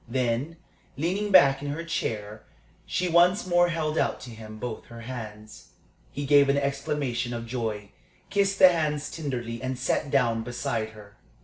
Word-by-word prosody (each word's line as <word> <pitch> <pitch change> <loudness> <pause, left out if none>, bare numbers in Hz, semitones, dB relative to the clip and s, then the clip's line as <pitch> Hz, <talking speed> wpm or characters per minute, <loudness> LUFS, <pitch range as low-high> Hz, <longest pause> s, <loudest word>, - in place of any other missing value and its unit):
Then, 130 +5 -1 0.4
leaning 190 +8 -1
back 135 -8 +6
in 145 - -5
her 155 +4 -4
chair, 110 -10 -3 0.5
she 180 - 0
once 175 +5 +4
more 175 -1 +3
held 160 -2 -1
out - - 0
to 125 - -9
him 110 -1 -10
both 110 0 -6
her 115 0 -11
hands. 110 -3 -9 0.4
He 145 - -4
gave 140 0 +5
an 140 - +3
exclamation 140 -3 -1
of 115 0 -5
joy, 110 -4 -4 0.4
kissed 195 0 +2
the 185 - +9
hands 150 -3 -1
tenderly, 120 -7 -4
and 130 0 -3
sat 130 +2 -1
down 120 -5 +2
beside 115 -2 -3
her. 100 -1 -14
130 Hz, 165 wpm, -26 LUFS, 115-160 Hz, 0.5 s, the